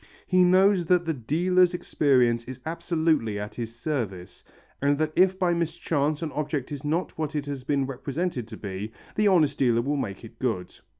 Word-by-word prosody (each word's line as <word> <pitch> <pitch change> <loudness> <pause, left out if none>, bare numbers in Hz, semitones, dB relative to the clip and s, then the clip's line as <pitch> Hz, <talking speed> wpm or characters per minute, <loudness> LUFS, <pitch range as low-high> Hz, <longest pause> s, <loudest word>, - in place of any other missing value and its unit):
He 185 -1 +4
knows 185 0 +4
that 180 0 +3
the 165 - 0
dealer's 175 +7 +2
experience 125 -8 +2
is 130 0 -8
absolutely 160 - 0
at 105 +1 -5
his 115 -1 -6
service, 115 - -4 0.4
and 140 +1 +2
that 155 0 -1
if 185 +1 +4
by 180 -2 +2
mischance 155 -2 -1
an 155 - -3
object 145 -2 -3
is 145 -1 -5
not 160 +5 -1
what 155 0 -2
it 145 -1 -1
has 140 -2 -5
been 140 0 0
represented 135 0 -3
to 110 -2 -9
be, 100 +1 -5 0.2
the 210 0 +3
honest 155 -7 +3
dealer 120 -3 +3
will 145 +3 -1
make 100 -7 -4
it 115 0 -14
good. 110 -9 -2
145 Hz, 185 wpm, -26 LUFS, 120-170 Hz, 0.4 s, He